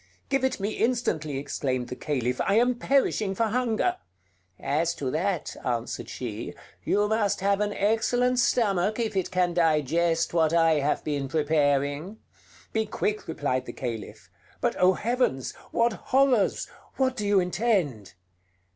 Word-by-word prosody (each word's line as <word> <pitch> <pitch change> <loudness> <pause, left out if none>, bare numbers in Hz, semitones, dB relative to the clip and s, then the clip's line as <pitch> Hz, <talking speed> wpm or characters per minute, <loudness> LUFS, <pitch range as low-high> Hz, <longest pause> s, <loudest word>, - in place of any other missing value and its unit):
"Give 275 -1 +1
it 265 - 0
me 200 +2 -1
instantly!" 190 - -1
exclaimed 130 -3 -2
the - - -5
Caliph: 125 -3 -2
"I 195 - +1
am 245 +3 +4
perishing 235 -6 +1
for 230 - +1
hunger!" 235 -1 0 0.6
"As 160 +4 0
to 130 -3 -3
that," 170 +2 -1
answered 120 -1 -3
she, 115 -3 -6 0.3
"you 205 +1 +2
must 210 -3 0
have 200 +1 +2
an 205 0 0
excellent 245 +5 +1
stomach 210 -4 +2
if 225 -4 -2
it 190 -2 0
can 180 -1 +1
digest 165 +1 +1
what 160 -2 +2
I 165 -2 +4
have 145 +1 0
been 145 -2 -2
preparing." 145 +4 0 0.6
"Be 220 -1 0
quick," 210 0 -2
replied 140 -5 -2
the - - -6
Caliph. 115 -5 -6 0.3
"But - - 0
oh, 185 +1 +5
heavens! 225 - -1 0.2
what 235 0 +2
horrors! 255 -4 +2 0.3
What 260 -1 +1
do 210 -4 -3
you 200 -1 +4
intend?" 180 - 0
180 Hz, 145 wpm, -26 LUFS, 145-220 Hz, 0.6 s, oh